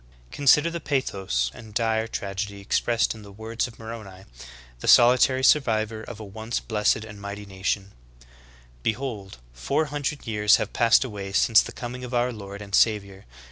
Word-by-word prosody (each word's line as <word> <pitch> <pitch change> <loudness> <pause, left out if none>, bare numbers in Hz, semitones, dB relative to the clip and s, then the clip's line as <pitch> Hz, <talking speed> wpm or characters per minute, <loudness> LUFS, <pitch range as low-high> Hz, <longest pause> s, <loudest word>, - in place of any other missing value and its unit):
Consider 145 - +4
the 170 - -4
pathos 95 - -1
and 110 -2 -13
dire 110 -1 +1
tragedy 100 -1 -4
expressed 115 +3 0
in 110 - -12
the 100 -1 -12
w^ords 110 +4 -3
of 115 - -14
Moroni, 110 -4 -9 0.6
the - - -6
solitary 130 +2 +6
survivor 110 -6 +2
of 110 -1 -9
a 110 - -7
once 110 +4 -4
blessed 110 0 0
and 105 -2 -11
mighty 100 +1 -7
nation: 95 0 -3 0.3
25. - - -21 0.5
"Behold, 110 - -3 0.2
four 65 - 0
hundred 145 0 -4
years 105 -1 +4
have - - -3
passed 115 +1 +4
away 100 -6 -6
since 110 +3 +5
the - - -7
coming 125 +1 -7
of 125 0 -5
our 120 +1 +1
Lord 100 -1 -8
and 100 -1 -13
Savior. 100 -3 +2
110 Hz, 170 wpm, -25 LUFS, 100-120 Hz, 0.6 s, solitary